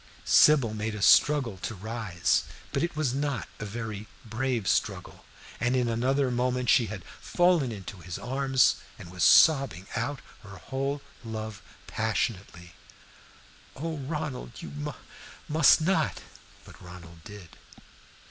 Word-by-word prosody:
Sybil 140 -8 +5
made 110 0 -3
a 105 - -6
struggle 135 -9 +4
to 110 - -5
rise, 105 -3 -1 0.3
but 140 - -1
it 170 -1 -2
was 150 -5 0
not 140 -2 -2
a 105 - -5
very 110 -1 -6 0.2
brave 115 -1 -2
struggle, 95 -3 -2 0.3
and 120 +2 +1
in 125 -2 +1
another 130 +3 +1
moment 125 0 0
she 120 - +4
had 100 -3 -7 0.2
fallen 175 -8 +2
into 100 -2 -8
his 85 0 -7
arms 135 0 +2 0.2
and 85 - -11
was 90 -2 -2
sobbing 135 - +5
out 125 +4 -2 0.2
her 100 -1 -12
whole 140 +6 -4 0.2
love 110 -3 -6 0.2
passionately. 100 -5 -3 1.0
"Oh, 160 +2 -4
Ronald, 145 -3 -5
you - - -7
mu 145 0 -5 0.5
must 155 +1 +5
not!" 190 +5 0 0.4
But - - -15
Ronald 85 -2 -12
did. 100 -5 -11
120 Hz, 135 wpm, -27 LUFS, 105-140 Hz, 1.0 s, Sybil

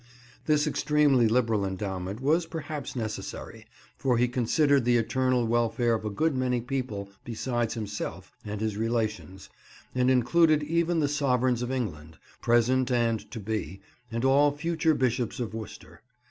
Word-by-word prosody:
This 150 -1 +3
extremely 150 -5 +3
liberal 115 -3 +2
endowment 95 +1 -4
was 160 +5 +2
perhaps 155 -4 -6
necessary, 110 -3 -6 0.3
for 125 -3 +1
he 120 - +3
had 125 0 0
considered 140 +3 +3
the 120 0 +3
eternal 125 +1 +1
welfare 115 +1 +1
of 110 - -1
a 105 - -2
good 150 +9 0
many 125 -1 0
people 120 -6 -4
besides 120 0 -2
himself 105 -2 -5
and 105 0 -5
his 110 -2 -2
relations, 110 -4 -2 0.5
and 125 0 +2
included 150 +5 +4
even 170 +2 +1
the 145 - +2
sovereigns 130 -4 +1
of 125 +1 -2
England, 80 -11 -4 0.2
present 125 +2 +2
and 115 -2 0
to 115 - -7
be, 100 -4 -4 0.3
and 115 +3 -1
all 140 +2 +5
future 160 +1 0
Bishops 125 -3 -1
of 115 -3 -3
Worcester. 110 -2 -9
125 Hz, 150 wpm, -27 LUFS, 110-140 Hz, 0.5 s, all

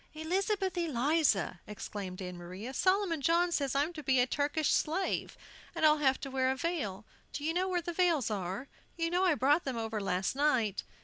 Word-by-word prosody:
"Elizabeth 380 +4 -1
Eliza!" 290 - +1
exclaimed 200 -2 -6
Ann 180 0 -6
Maria, 185 +8 -7
"Solomon 370 -2 +1
John 340 +4 +3
says 275 -5 0
I'm 295 +5 +1
to 310 - -7
be 265 -2 +2
a 245 - +5
Turkish 290 +3 0
slave, 360 +5 -1 0.4
and - - +2
I'll 305 0 +5
have 265 -2 +2
to 275 -3 -5
wear 260 0 +1
a 265 - +1
veil. 260 - -3 0.3
Do 290 - -5
you 320 +2 0
know 365 +2 +1
where 355 -2 0
the 345 - -4
veils 330 - +2
are? 195 +5 -3 0.3
You 330 0 -1
know 360 +2 +2
I 350 -4 +4
brought 290 +5 +3
them 260 -3 -3
over 225 -1 -3
last 190 +3 -1
night." 255 -8 +1
285 Hz, 195 wpm, -31 LUFS, 225-335 Hz, 0.4 s, a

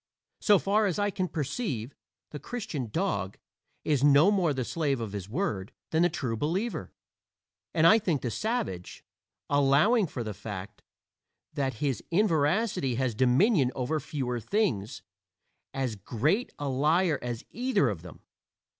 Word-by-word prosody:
So 205 -2 +5
far 205 +3 +2
as 180 - -1
I 205 0 +1
can 185 -1 -1
perceive, 145 - -3 0.4
the 150 - -6
"Christian 155 - -5
dog" 105 - -2 0.5
is 145 -3 +1
no 145 +6 +6
more 185 -6 +2
the 130 -3 -2
slave 145 -4 -1
of 110 -3 -4
his 100 -1 -6
word 110 - -2 0.2
than 160 - +2
the 175 - +4
True 120 -8 -3
Believer, 180 - -2 0.8
and 160 -2 +2
I 220 +7 +7
think 175 -10 -1
the 120 - -1
savage 160 - -3 0.4
allowing 145 - +4
for 125 -5 -5
the 110 -2 -4
fact 100 0 -8 0.7
that 135 -2 -1
his 135 -4 -1
inveracity 170 - +2
has 130 -1 0
dominion 130 - +3
over 135 +5 -1
fewer 125 -4 -3
things 115 - -1 0.7
as 130 -4 -2
great 145 - 0
a 145 - -3
liar 150 +4 +2
as 120 -2 -5
either 245 - +1
of 100 -8 -3
them. 90 -2 -12
145 Hz, 145 wpm, -28 LUFS, 120-190 Hz, 0.8 s, I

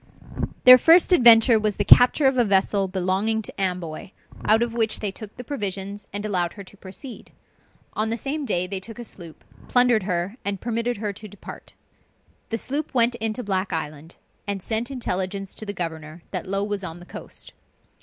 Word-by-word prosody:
Their 255 -1 +10
first 340 +5 +6
adventure 235 -5 +7
was 210 -1 -1
the - - -1
capture 250 +4 +6
of 265 0 +4
a 245 - +3
vessel 195 -1 +1
belonging 190 +4 -1
to 195 - -7
Amboy, 180 -3 -3 0.4
out 220 +2 +4
of 235 -1 -4
which 225 -2 0
they 205 -2 -2
took 210 +1 -10
the 250 - -7
provisions, 200 -5 -5
and 205 +1 -4
allowed 180 -5 -1
her 200 - -10
to 190 - -16
proceed. 205 +6 -11 0.6
On 215 +1 -1
the 230 - -1
same 285 +5 -4
day 180 -8 0
they 190 +1 -4
took 225 +4 -9
a 240 - -7
sloop, 175 -7 -12 0.2
plundered 245 -3 +4
her, 180 +3 -3
and 200 -1 -2
permitted 235 +1 -2
her 205 -1 -3
to 215 +2 -10
depart. 205 0 -12 0.7
The 225 - -2
sloop 280 +4 -3
went 240 0 +4
into 225 +2 -2
Black 190 -2 -2
Island, 160 0 -6 0.3
and 200 -2 -3
sent 225 +2 -1
intelligence 195 -6 -4
to 215 - -8
the - - -2
governor 165 -3 -6
that - - -4
Low 195 +1 -1
was 205 -1 -3
on 170 -1 -7
the 175 - -13
coast. - - -8
205 Hz, 190 wpm, -23 LUFS, 190-235 Hz, 0.7 s, Their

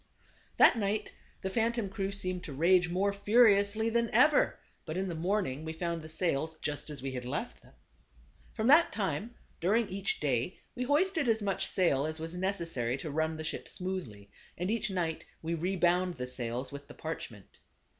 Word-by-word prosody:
That 235 - +7
night 205 +1 -1 0.3
the 190 - -2
phantom 230 0 0
crew 195 -1 -3
seemed 185 -2 -1
to 145 - -6
rage 175 +4 +4
more 195 +3 +1
furiously 205 0 +4
than 235 0 +1
ever, 285 +6 +4 0.3
but 155 - -5
in 190 +1 -1
the 175 - -3
morning 165 -4 -1
we 160 0 -4
found 170 0 -3
the 155 - -9
sails 160 -1 0
just 150 +1 -4
as 145 -3 -6
we 135 - -2
had 125 -1 -4
left 125 - -4
them. - - -20 0.8
From 220 - -1
that 300 +7 +6
time, 205 +3 -2 0.2
during 210 +6 +2
each 195 +1 -2
day 135 +3 0 0.2
we 250 - -3
hoisted 320 +2 +2
as 220 -1 +2
much 195 -1 0
sail 155 -6 +2
as 155 0 -4
was 165 +1 -5
necessary 170 -10 -1
to 150 +2 -5
run 160 +1 0
the 155 - -5
ship 155 - -3
smoothly, 175 - -5 0.3
and 180 +4 -1
each 230 -1 0
night 170 -4 -2 0.2
we 165 +1 -1
rebound 180 +1 +1
the 125 -2 -4
sails 125 0 -4
with 140 0 -9
the - - -12
parchment. 120 -10 -7
180 Hz, 185 wpm, -31 LUFS, 155-205 Hz, 0.8 s, That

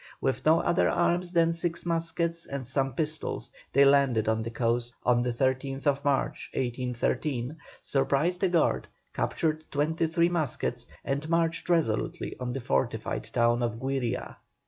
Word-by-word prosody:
With 135 +3 -1
no 160 +2 +6
other 175 +1 +2
arms 175 +1 +1
than 165 -1 +3
six 170 0 -2
muskets 170 0 -1
and 140 -2 -4
some 135 0 0
pistols, 155 0 -2 0.2
they 140 +1 +6
landed 135 -6 +4
on 110 0 +1
the 115 - -3
coast 115 +1 -1
on 120 -1 +4
the 125 - 0
13th 130 +2 -1 0.2
March, 140 -2 0
1813, 125 +2 -1 0.3
surprised 140 +7 +1
a 190 - +4
guard, 170 -3 +2 0.3
captured 155 -1 -1
twenty 160 +3 0
three 170 +1 +2
muskets, 130 -7 -1 0.2
and 140 +3 -2
marched 165 0 0
resolutely 160 -11 0
on 125 -1 -3
the 135 - -3
fortified 65 - -1
town 120 0 +2
of 115 -2 -1
Güiria. 125 -1 -3
140 Hz, 145 wpm, -28 LUFS, 125-165 Hz, 0.3 s, no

